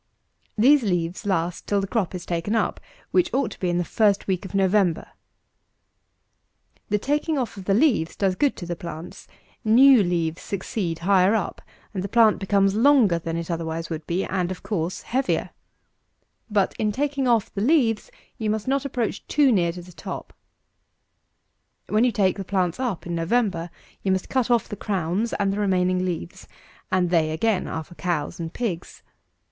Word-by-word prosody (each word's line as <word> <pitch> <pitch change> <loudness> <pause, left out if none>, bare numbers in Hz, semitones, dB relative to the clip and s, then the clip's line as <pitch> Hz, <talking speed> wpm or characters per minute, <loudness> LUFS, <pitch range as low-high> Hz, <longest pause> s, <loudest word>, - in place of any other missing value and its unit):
These 275 +6 +6
leaves 180 -1 -2
last 175 -2 -1
till 205 - +2
the 195 - -1
crop 195 -3 -1
is 180 - -6
taken 175 +5 -1
up, 225 - 0 0.3
which 360 - +2
ought 270 -2 +1
to - - -11
be 180 - 0
in 175 - 0
the 175 - +1
first 200 +3 +2
week 190 0 -1
of 195 - -7
November. 195 -3 +2 1.8
The 210 - +2
taking 295 +7 0
off 250 -4 -2
of 195 -2 -9
the 195 - +2
leaves 220 - +2
does 195 -2 +1
good 280 +9 +1
to 175 - -7
the 175 0 -3
plants: 170 0 -8 0.4
new 250 +2 +7
leaves 170 -3 -1
succeed 190 -3 -3
higher 195 +1 +4
up; 210 - -2 0.3
and 185 -2 -3
the - - -2
plant 225 -1 +4
becomes 195 0 +2
longer 225 -6 +4
than 165 0 -4
it 170 +1 -4
otherwise 165 0 -3
would 155 -1 -5
be, 175 +3 -1
and, 180 -2 -1
of 185 - -6
course, 180 -4 -3
heavier. 265 +2 -1 1.0
But, 205 -2 +1
in 210 -1 +1
taking 275 +2 -1
off 230 -4 +2
the 195 - -3
leaves, 235 -4 +2 0.3
you 220 -2 -1
must 215 +1 -2
not 275 +1 0
approach 245 -6 -3
too 285 -2 +4
near 175 -6 +2
to 175 +1 -9
the 180 - -13
top. - - -7 1.6
256. - - -7
When 215 +2 +4
you 250 - +3
take 195 -3 +1
the 195 - -4
plants 185 0 -1
up 240 -10 -2
in 175 - -4
November, 175 0 0 0.3
you 195 - 0
must 190 -1 -1
cut 260 -2 0
off 240 -2 +2
the - - -6
crowns 195 +2 -1
and 195 -1 0
the 205 - -3
remaining 185 -2 +1
leaves; 170 - -5 0.4
and 180 -2 +1
they, 160 -3 +3
again, 185 +5 0
are 160 - -4
for 165 - -15
cows 175 -1 -3
and 165 -1 -4
pigs. 185 -8 -4
195 Hz, 185 wpm, -24 LUFS, 175-225 Hz, 1.8 s, new